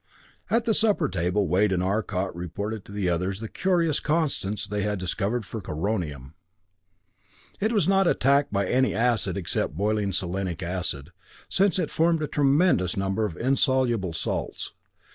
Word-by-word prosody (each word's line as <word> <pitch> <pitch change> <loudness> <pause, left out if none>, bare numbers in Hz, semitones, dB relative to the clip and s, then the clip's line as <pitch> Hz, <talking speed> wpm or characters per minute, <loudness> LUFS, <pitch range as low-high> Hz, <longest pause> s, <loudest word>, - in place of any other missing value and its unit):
At 230 0 +2
the 225 - +3
supper 220 -1 +2
table 90 +2 0
Wade 95 +5 +3
and 90 -1 +1
Arcot 95 -2 -1
reported 100 +5 -4
to - - -12
the 100 -2 -2
others 90 +3 -1
the 110 - -5
curious 170 - +1
constants 135 - -1
they 105 +1 -2
had 105 +1 -1
discovered 100 +5 -2
for 110 +1 -6
coronium. 80 - -3 1.3
It 215 +3 +1
was 210 -5 +2
not 195 -1 +4
attacked 140 -1 +3
by 100 -1 +1
any 130 +4 +2
acid 115 -5 +1
except 85 -4 -1
boiling 105 0 0
selenic 90 -1 -2
acid, 85 -4 -3 0.4
since 195 -1 +3
it 185 - -1
formed 165 -1 +2
a - - -1
tremendous 140 - +2
number 95 +3 0
of 90 -7 -5
insoluble 130 - +1
salts. 80 - -3
105 Hz, 155 wpm, -26 LUFS, 95-135 Hz, 1.3 s, not